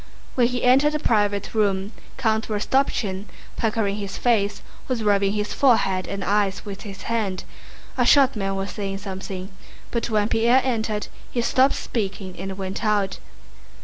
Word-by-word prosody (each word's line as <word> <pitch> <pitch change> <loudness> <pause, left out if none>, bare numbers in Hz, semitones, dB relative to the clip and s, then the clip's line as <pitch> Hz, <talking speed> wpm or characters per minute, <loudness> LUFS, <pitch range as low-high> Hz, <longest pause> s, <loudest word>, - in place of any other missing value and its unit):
When 245 -2 +3
he 250 0 -3
entered 275 +4 +5
the 300 - 0
private 205 -5 +1
room 200 -2 +1 0.3
Count 220 -4 +1
Rostopchín, 210 -3 0 0.3
puckering 215 -3 0
his 200 -2 -5
face, 210 -4 +1 0.2
was 245 -4 -1
rubbing 200 -1 +3
his 210 0 -2
forehead 195 -8 +3
and 200 -1 -4
eyes 200 0 +1
with 200 -1 -7
his 195 -2 -8
hand. 210 -5 -1 0.6
A - - +5
short 275 -3 +6
man 195 -2 -1
was 195 +1 -3
saying 195 -2 -4
something, 190 -1 -6 0.4
but 235 0 -1
when 210 -2 +2
Pierre 235 +4 +4
entered 220 -4 -1 0.2
he 240 - -1
stopped 260 +3 +3
speaking 195 -4 -4
and 190 0 -5
went 190 +2 -4
out. 205 -3 +1
210 Hz, 155 wpm, -23 LUFS, 195-235 Hz, 0.6 s, short